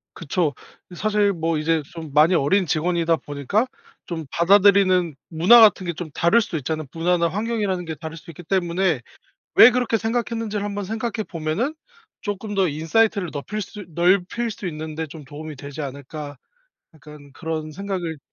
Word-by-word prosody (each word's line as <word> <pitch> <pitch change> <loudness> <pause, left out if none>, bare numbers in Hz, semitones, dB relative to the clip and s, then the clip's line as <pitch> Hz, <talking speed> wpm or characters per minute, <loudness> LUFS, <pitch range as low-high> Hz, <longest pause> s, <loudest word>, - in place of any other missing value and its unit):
그쵸. 165 -2 -1 0.4
사실 205 +1 +1
뭐 165 -2 -1
이제 160 0 +1
좀 160 -4 -8
많이 155 +4 +5
어린 180 +5 +2
직원이다 165 +1 +1
보니까 145 - -1 0.4
좀 165 -2 -5
받아들이는 185 -2 +4
문화 180 +9 +6
같은 205 -4 +5
게 170 - -1
좀 165 0 -7
다를 170 +11 +3
수도 215 -7 -3
있잖아요. 155 +2 -3
문화나 170 +1 +1
환경이라는 205 -1 -2
게 160 -1 -5
다를 160 +2 -7
수 165 - -12
있기 165 +2 -11
때문에 175 -3 +1 0.6
왜 225 - +10
그렇게 245 -2 +1
생각했는지를 225 -2 -2
한번 205 0 -3
생각해 225 +2 -3
보면은 170 - -2 0.5
조금 205 +1 -4
더 190 -2 +3
'인사이트를 180 +5 +1
넙힐 150 +9 -4
수 205 0 -8
넓힐 185 +7 +2
수 200 - -8
있는 155 -1 -6
데 160 +1 -3
좀 155 +1 -11
도움이 150 +2 -8
되지 140 +3 -8
않을까.' 145 +1 -7 0.6
약간 150 -2 -14
그런 160 0 -4
생각을 180 -2 -4
175 Hz, 350 characters per minute, -22 LUFS, 155-205 Hz, 0.6 s, 왜